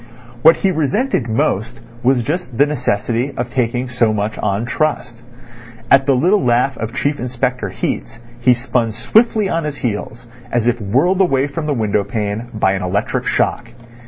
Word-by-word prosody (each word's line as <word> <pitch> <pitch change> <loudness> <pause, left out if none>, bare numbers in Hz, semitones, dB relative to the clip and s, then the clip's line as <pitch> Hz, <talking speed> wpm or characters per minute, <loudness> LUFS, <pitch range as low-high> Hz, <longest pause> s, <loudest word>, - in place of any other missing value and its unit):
What 160 +4 +7
he 195 - +1
resented 160 - 0
most 110 +2 -1 0.2
was 125 -1 +2
just 150 -4 -4
the 145 - +5
necessity 125 -2 -1
of 120 0 -3
taking 125 0 -1
so 120 -3 +1
much 105 0 -2
on 100 +4 -1
trust. 125 -4 -2 0.7
At 135 0 +5
the 135 - +4
little 185 +10 +3
laugh 125 +2 +2
of 115 +2 -5
Chief 145 +1 -1
Inspector 125 -3 -2
Heat's 105 - -4 0.2
he 125 +1 +4
spun 120 -2 -1
swiftly 215 - +2
on 165 -2 -1
his 150 -1 -3
heels, 115 0 -4 0.2
as 120 -2 +1
if 120 -1 +1
whirled 140 - +2
away 135 -7 +2
from 150 +2 -4
the 145 - 0
window 105 -3 0
pane 105 +3 -3
by 95 -3 +2
an 95 0 -2
electric 90 +3 -1
shock. 120 -1 0
125 Hz, 170 wpm, -18 LUFS, 115-145 Hz, 0.7 s, What